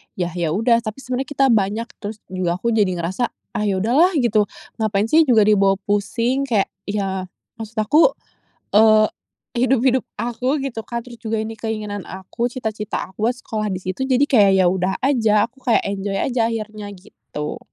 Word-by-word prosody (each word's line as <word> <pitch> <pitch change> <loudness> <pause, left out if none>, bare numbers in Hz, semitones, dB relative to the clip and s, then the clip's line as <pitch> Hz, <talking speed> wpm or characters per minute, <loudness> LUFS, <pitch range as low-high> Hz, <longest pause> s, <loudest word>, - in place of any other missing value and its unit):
yah 175 -1 -2
ya 170 -2 -2
udah 230 +4 +3
tapi 215 +3 -5
sebenarnya 255 +1 -3
kita 275 -1 +3
banyak. 215 +1 +1
Terus 210 0 -6
juga 180 -2 -1
aku 235 - +1
jadi 210 -4 +2
ngerasa, 175 +7 -2 0.3
"Ah 210 - 0
ya 195 - +1
udahlah!" 290 - +4
Gitu. 230 -7 +3 0.3
Ngapain 215 0 0
sih 320 +1 +6
juga 235 -4 +5
dibawa 200 -2 +4
pusing 230 +6 0
kayak 215 -6 +1 0.2
ya 195 -2 -2 0.3
maksud 225 0 -8
aku, 300 - +5 0.7
eee, 215 0 +6 0.5
hidup-hidup 255 0 +2
aku 250 +5 -1
gitu 235 -5 -5
kan? 235 0 -4
Terus 240 -1 -12
juga 220 -1 -2
ini 220 0 -6
keinginan 210 -3 -4
aku, 190 +5 -4
cita-cita 220 -5 -4
aku, 210 +3 -2
sekolah 220 -3 -4
di 185 - -5
situ 185 +9 -3
jadi 260 0 +2
kayak 215 -9 +5
ya - - +3
udah 185 +1 0
aja, 225 -6 +3
aku 265 - -26
kayak 235 - +4
enjoy 200 0 -3
aja 235 +2 +1
akhirnya 215 -2 -4
gitu. 180 -6 -8
220 Hz, 175 wpm, -21 LUFS, 200-245 Hz, 0.7 s, sih